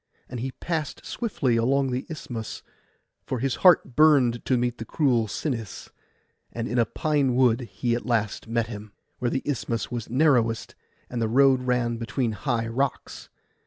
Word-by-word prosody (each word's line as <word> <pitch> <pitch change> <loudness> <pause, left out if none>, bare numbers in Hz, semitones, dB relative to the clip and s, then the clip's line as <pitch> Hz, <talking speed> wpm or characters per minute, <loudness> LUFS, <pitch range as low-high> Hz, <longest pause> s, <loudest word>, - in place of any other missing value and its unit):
And 125 - -6
he 130 +3 -3
past 160 -4 -4
swiftly 140 - -1
along 135 +3 +2
the 125 +2 -3
Isthmus, 120 -8 -6 0.6
for 130 - -3
his 130 +2 -1
heart 175 -9 +5
burned 140 -6 +4
to 130 - +2
meet 120 0 -1
that 115 - -6
cruel 125 -8 +2
Sinis; 115 - -4 0.6
and 115 0 -4
in 120 - 0
a 115 - +3
pine 140 0 0
wood 125 -1 +2 0.2
at 120 - -2
last 110 -4 0
he 115 - -12
met 115 -1 +1
him, 105 -2 -9 0.3
where 120 - 0
the 135 - -2
Isthmus 120 -5 -2
was 120 -3 -4
narrowest 125 -4 +2 0.3
and 120 -1 -4
the 110 - 0
road 135 +1 +4
ran 120 -2 +1
between 120 +1 -2
high 115 0 -1
rocks. 130 +4 -3
125 Hz, 165 wpm, -25 LUFS, 115-135 Hz, 0.6 s, heart